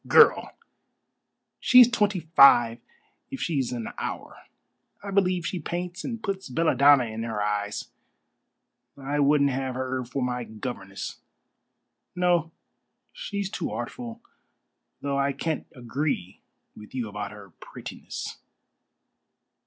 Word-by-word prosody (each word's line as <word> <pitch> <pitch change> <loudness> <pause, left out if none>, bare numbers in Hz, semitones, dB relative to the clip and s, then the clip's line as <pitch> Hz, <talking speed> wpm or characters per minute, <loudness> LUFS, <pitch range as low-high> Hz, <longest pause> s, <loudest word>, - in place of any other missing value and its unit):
"Girl! - - +5 1.0
She's 250 -2 +8
twenty 210 -6 +1
five 130 -7 +6 0.5
if 270 -1 -6
she's 140 -7 -1
an 120 -3 -4
hour. - - -5 0.7
I 200 - -5
believe 185 -3 +2
she 180 - -2
paints 175 +2 -4
and 230 -3 -5
puts 195 -5 -3
belladonna 140 -2 +5
in 110 -1 -5
her 115 -2 -3
eyes. 105 0 -2 1.1
I 140 +2 -2
wouldn't 140 0 +4
have 130 -1 -2
her 130 0 -2
for 125 +2 -3
my 125 -1 -2
governess. 105 -3 -6 1.0
No, 175 -2 +2 0.6
she's 200 - -4
too - - -3
artful, 235 -2 -6 0.8
though 140 -1 -1
I 140 0 +1
can't 160 0 -3
agree 125 - -3 0.3
with 105 +4 -12
you 120 -3 -2
about 105 -1 -5
her 100 -2 -12
prettiness." - - -8
140 Hz, 115 wpm, -26 LUFS, 120-180 Hz, 1.1 s, She's